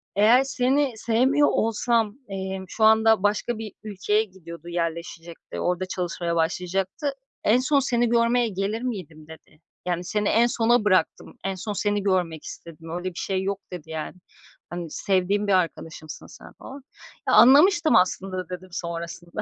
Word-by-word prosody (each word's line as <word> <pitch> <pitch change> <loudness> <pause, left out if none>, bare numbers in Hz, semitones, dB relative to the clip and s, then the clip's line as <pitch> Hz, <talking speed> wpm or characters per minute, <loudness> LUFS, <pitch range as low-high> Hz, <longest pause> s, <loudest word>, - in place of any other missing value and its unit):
"Eğer 225 +6 +5
seni 270 0 +1
sevmiyor 255 +7 +2
olsam," 225 0 +1
emm, 190 -1 -5
şu 220 - -2
anda 220 -2 +5
başka 210 +3 0
bir 215 -2 -7
ülkeye 210 +1 0
gidiyordu 170 -5 -12
yerleşecekti, 170 0 -5
orada 180 +1 -1
çalışmaya 175 -2 -3
başlayacaktı, 185 - -1 0.3
"en 230 +4 +4
son 275 +2 +2
seni 240 -3 +1
görmeye 235 +1 +3
gelir 200 +3 -3
miydim?" 165 -11 -6
dedi. 160 0 -15 0.3
"Yani, 175 0 -1
seni 210 +3 -1
en 235 +2 +4
sona 235 -1 +2
bıraktım, 185 -3 +1
en 195 0 -1
son 210 +3 -5
seni 205 0 -1
görmek 180 -5 0
istedim, 165 -1 -10
öyle 175 +2 -5
bir 180 - -9
şey 190 -1 -2
yok." 200 +1 -2
dedi, 170 -3 -8
yani. 160 +1 -5 0.5
Hani, 175 -1 -6
"Sevdiğim 195 +3 0
bir 200 - +3
arkadaşımsın 165 -3 -3
sen." - - -14
falan. 275 0 -11 0.4
"Ya - - +2
anlamıştım 315 +6 +6
aslında 185 +1 +1
da" 185 -2 -5
dedim 185 +1 -8
sonrasında. 170 +2 -5
195 Hz, 155 wpm, -24 LUFS, 175-230 Hz, 0.5 s, anlamıştım